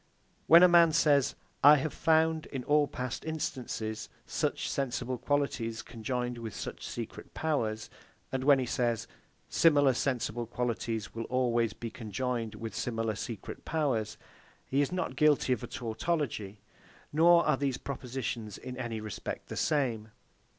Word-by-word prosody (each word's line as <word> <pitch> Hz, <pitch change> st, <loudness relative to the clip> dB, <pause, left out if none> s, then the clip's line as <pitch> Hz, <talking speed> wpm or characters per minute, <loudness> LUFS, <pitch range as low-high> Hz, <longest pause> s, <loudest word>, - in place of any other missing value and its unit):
When 170 Hz, +2 st, +9 dB
a -, -, +10 dB
man 170 Hz, -2 st, +6 dB
says, 145 Hz, -4 st, +3 dB, 0.3 s
I 145 Hz, +2 st, +10 dB
have 150 Hz, +1 st, -1 dB
found, 160 Hz, 0 st, +2 dB
in 135 Hz, -3 st, -5 dB
all 145 Hz, +2 st, +3 dB
past 125 Hz, -3 st, -5 dB
instances, 130 Hz, -8 st, -4 dB, 0.2 s
such -, -, -1 dB
sensible 130 Hz, -2 st, -2 dB
qualities 125 Hz, -4 st, -1 dB
conjoined 125 Hz, +1 st, -3 dB
with 110 Hz, -3 st, -6 dB
such -, -, -6 dB
secret -, -, -7 dB
powers: 115 Hz, -9 st, -1 dB, 0.4 s
And 130 Hz, -1 st, -2 dB
when 140 Hz, 0 st, +6 dB
he 130 Hz, -, -1 dB
says, 120 Hz, -2 st, -1 dB, 0.4 s
Similar 145 Hz, -5 st, +4 dB
sensible 120 Hz, -2 st, -1 dB
qualities 115 Hz, -3 st, -3 dB
will 115 Hz, 0 st, -4 dB
always 120 Hz, -3 st, +1 dB
be 115 Hz, 0 st, -6 dB
conjoined 115 Hz, 0 st, -3 dB
with 110 Hz, 0 st, -6 dB
similar 115 Hz, -1 st, -1 dB
secret 105 Hz, 0 st, -6 dB
powers, 130 Hz, -9 st, -1 dB, 0.5 s
he 135 Hz, +2 st, +1 dB
is 145 Hz, -, 0 dB
not 180 Hz, -7 st, -2 dB
guilty 145 Hz, -2 st, +4 dB
of 120 Hz, -, -3 dB
a -, -, -4 dB
tautology, 115 Hz, -, -3 dB, 0.5 s
nor 170 Hz, +2 st, +6 dB
are -, -, +3 dB
these 135 Hz, -2 st, -1 dB
propositions 125 Hz, -5 st, -5 dB
in 130 Hz, 0 st, -7 dB
any 120 Hz, -3 st, -3 dB
respect 105 Hz, -2 st, -6 dB
the -, -, -5 dB
same. 120 Hz, -7 st, 0 dB
125 Hz, 145 wpm, -30 LUFS, 115-145 Hz, 0.5 s, a